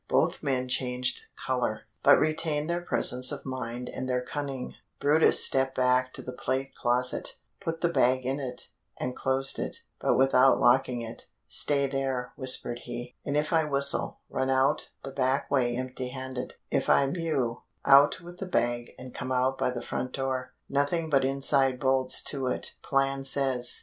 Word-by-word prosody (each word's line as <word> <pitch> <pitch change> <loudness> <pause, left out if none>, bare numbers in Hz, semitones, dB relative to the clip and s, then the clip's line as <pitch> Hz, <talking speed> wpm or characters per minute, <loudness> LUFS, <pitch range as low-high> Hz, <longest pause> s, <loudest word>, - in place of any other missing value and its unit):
Both - - +1
men 130 -2 -1
changed 125 - -2
color, - - -2 0.2
but - - +7
retained 155 -1 0
their 170 +1 -1
presence 125 -6 +2
of 145 - -7
mind 125 -2 -5
and 130 - -5
their 125 0 0
cunning. 135 -1 -5 0.3
brutus 150 +3 +6
stepped 135 0 +2
back 130 0 +2
to - - -6
the 125 - -7
plate 130 +2 -3
closet, 125 +1 +1 0.2
put 165 0 -4
the 170 - +3
bag 130 -6 +2
in 135 +2 -1
it, 125 -3 -5 0.3
and 125 0 -3
closed 135 0 0
it, - - -4 0.2
but - - +1
without 135 0 +4
locking 125 -1 +3
it. 115 0 -8 0.2
"Stay 140 -1 +2
there," 135 -2 -3
whispered 125 -3 0
he, 120 0 -7
"and 145 +1 -1
if 150 +3 -1
I 160 -1 +4
whistle 140 -1 +2
run 130 0 -2
out 135 +2 +1
the 135 - -6
back 135 0 0
way 120 -3 +1
empty 130 0 -4
handed. 130 -1 -6 0.2
If - - 0
I 140 - +5
mew 140 -6 -2 0.2
out 140 +3 +6
with 175 +1 -12
the 195 - -5
bag 120 -7 -1
and 130 0 -10
come 130 +1 -5
out 130 +1 +1
by - - +1
the 125 -1 -5
front 125 0 -4
door; 130 -1 -3
nothing 150 +4 0
but 135 -2 +3
inside 135 -1 +1
bolts 130 -1 +1
to 135 -3 -2
it, 125 - -1
plan 135 0 0
says." 135 -3 +1
130 Hz, 175 wpm, -28 LUFS, 125-140 Hz, 0.3 s, but